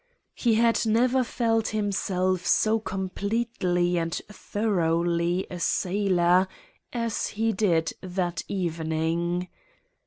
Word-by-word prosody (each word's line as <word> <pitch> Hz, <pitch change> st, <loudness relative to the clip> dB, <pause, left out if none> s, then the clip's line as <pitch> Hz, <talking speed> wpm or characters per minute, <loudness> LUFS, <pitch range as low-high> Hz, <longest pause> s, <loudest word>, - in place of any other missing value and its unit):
He 235 Hz, -3 st, +1 dB
had 230 Hz, +1 st, +3 dB
never 245 Hz, +3 st, +3 dB
felt 225 Hz, -2 st, 0 dB
himself 190 Hz, -3 st, 0 dB
so 220 Hz, +4 st, +3 dB
completely 190 Hz, -2 st, -1 dB
and 165 Hz, 0 st, -2 dB, 0.2 s
thoroughly 175 Hz, -4 st, 0 dB
a 180 Hz, -, -5 dB
sailor 185 Hz, -2 st, +2 dB, 0.4 s
as 230 Hz, -3 st, -1 dB
he 225 Hz, +2 st, 0 dB
did 170 Hz, -6 st, +1 dB
that 180 Hz, -2 st, -2 dB
evening. 170 Hz, 0 st, -1 dB
185 Hz, 95 wpm, -26 LUFS, 175-220 Hz, 0.4 s, had